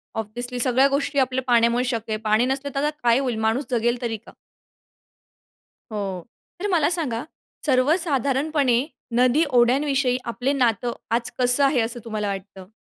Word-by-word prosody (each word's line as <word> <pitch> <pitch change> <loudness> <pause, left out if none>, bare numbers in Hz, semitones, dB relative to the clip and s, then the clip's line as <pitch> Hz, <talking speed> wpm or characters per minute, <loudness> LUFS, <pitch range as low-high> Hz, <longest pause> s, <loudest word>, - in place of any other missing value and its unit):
Obviously 240 +3 -1
सगळ्या 260 +2 +4
गोष्टी 280 0 0
आपल्या 260 0 0
पाण्यामुळे 235 0 +3
शक्य 230 -2 -3
आहे. 215 - -1
पाणी 215 +3 +2
नसले 270 +2 -2
तर, 275 - 0
आता 300 - +2
काय 235 +1 +4
होईल? 250 -5 -2
माणूस 225 +6 0
जगेल 240 +1 0
तरी 225 -2 -2
का? 215 - -17 1.6
हो. 195 -4 -4 0.4
तर 410 - -2
मला 330 -6 +2
सांगा, 290 -9 -1 0.4
सर्वसाधारणपणे 280 -2 +1 0.3
नदी, 255 +6 +4
ओढ्यांविषयी 255 +1 +2
आपलं 265 +4 -1
नातं 240 -1 +1 0.2
आज 235 0 -2
कसं 250 +3 +4
आहे, 270 -2 +2
असं 230 +2 -2
तुम्हाला 215 -2 -3
वाटतं? 195 -1 -7
250 Hz, 150 wpm, -23 LUFS, 230-275 Hz, 1.6 s, सगळ्या